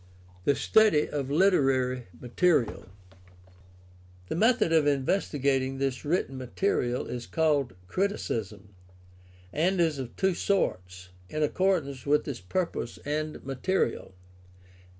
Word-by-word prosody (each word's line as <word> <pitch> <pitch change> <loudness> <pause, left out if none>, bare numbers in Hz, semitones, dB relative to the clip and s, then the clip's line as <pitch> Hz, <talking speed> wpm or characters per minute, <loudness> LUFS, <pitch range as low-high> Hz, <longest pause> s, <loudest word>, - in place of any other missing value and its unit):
THE 140 - +3
STUDY 210 - +4
OF 140 -2 -3
LITERARY 135 - +2
MATERIAL 125 - +1 1.4
The - - -2
method 220 -3 +3
of 155 -2 +4
investigating 135 -2 0
this 135 -2 -2
written 145 -4 -1
material 125 -2 -1
is 120 -1 -6
called 145 - +1
criticism, 110 - -3 0.8
and 180 +4 +1
is 160 -4 +2
of 125 -3 -6
two 190 -1 +1
sorts, 90 - -1 0.2
in 155 0 -1
accordance 150 -6 0
with 150 +1 +2
its 135 -5 -5
purpose 120 - -3
and 155 0 -3
material. 135 - -1
140 Hz, 110 wpm, -28 LUFS, 125-175 Hz, 1.4 s, STUDY